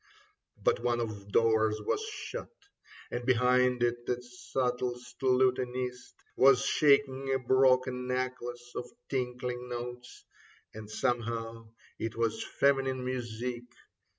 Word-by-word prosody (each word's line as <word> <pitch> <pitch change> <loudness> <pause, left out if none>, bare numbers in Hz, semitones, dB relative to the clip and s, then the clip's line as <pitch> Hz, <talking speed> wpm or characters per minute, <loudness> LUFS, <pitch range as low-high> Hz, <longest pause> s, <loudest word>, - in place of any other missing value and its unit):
But - - +3
one 120 0 0
of 110 -3 -3
the 100 0 -16
doors 110 -1 +3
was 105 - -1
shut, 440 -1 -6 0.6
And 120 - -3
behind 125 0 +3
it 120 0 0
the 125 - 0
subtlest 125 0 -3
lutanist 125 -1 +1 0.2
Was 135 0 +6
shaking 135 -2 +3
a 135 - +3
broken 130 0 +3
necklace 125 -1 -3
of 125 - -4 0.2
tinkling 125 -1 -3
notes, 120 0 -7 0.5
And 110 -1 -9
somehow 115 -1 -2 0.3
it 115 0 -3
was 115 -1 0
feminine 135 -2 +1
music. 120 -1 -3
125 Hz, 115 wpm, -30 LUFS, 120-130 Hz, 0.6 s, Was